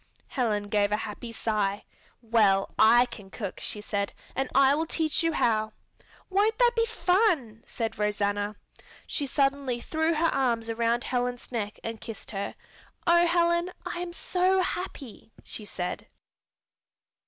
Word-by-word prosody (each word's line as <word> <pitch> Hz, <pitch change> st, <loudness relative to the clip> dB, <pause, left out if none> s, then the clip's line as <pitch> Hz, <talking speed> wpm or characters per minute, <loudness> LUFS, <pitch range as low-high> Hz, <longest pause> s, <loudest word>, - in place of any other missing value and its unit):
Helen 220 Hz, -5 st, 0 dB
gave 205 Hz, 0 st, +1 dB
a 210 Hz, -, +2 dB
happy 225 Hz, +2 st, -6 dB
sigh. 210 Hz, -3 st, -1 dB, 0.4 s
"Well, 210 Hz, -4 st, +3 dB
I 235 Hz, +3 st, +7 dB
can 210 Hz, -5 st, -11 dB
cook," 200 Hz, -1 st, -6 dB
she 210 Hz, -, -3 dB
said, 200 Hz, -1 st, -2 dB, 0.2 s
"and 270 Hz, 0 st, -1 dB
I 275 Hz, 0 st, +6 dB
will 320 Hz, +3 st, 0 dB
teach 315 Hz, -1 st, +1 dB
you 330 Hz, 0 st, +2 dB
how." 220 Hz, -6 st, +1 dB, 0.5 s
"Won't 415 Hz, +3 st, +2 dB
that 485 Hz, -1 st, +5 dB
be 460 Hz, 0 st, +2 dB
fun!" 360 Hz, -, +1 dB
said 225 Hz, -2 st, -4 dB
Rosanna. 205 Hz, 0 st, 0 dB, 0.5 s
She 285 Hz, -, -2 dB
suddenly 275 Hz, -3 st, +1 dB
threw 320 Hz, +5 st, 0 dB
her 330 Hz, +1 st, +2 dB
arms 235 Hz, -4 st, 0 dB
around 235 Hz, +1 st, +1 dB
Helen's 245 Hz, -1 st, -2 dB
neck 215 Hz, -3 st, -3 dB
and 225 Hz, -1 st, -5 dB
kissed 220 Hz, -2 st, -8 dB
her. 200 Hz, -1 st, -4 dB, 0.5 s
"Oh, 345 Hz, 0 st, +5 dB
Helen, 340 Hz, +1 st, +2 dB
I -, -, -4 dB
am 355 Hz, 0 st, -4 dB
so 370 Hz, +2 st, +1 dB
happy," 280 Hz, -, -6 dB
she 215 Hz, -, -5 dB
said. 180 Hz, -3 st, -4 dB
240 Hz, 145 wpm, -28 LUFS, 215-330 Hz, 0.5 s, I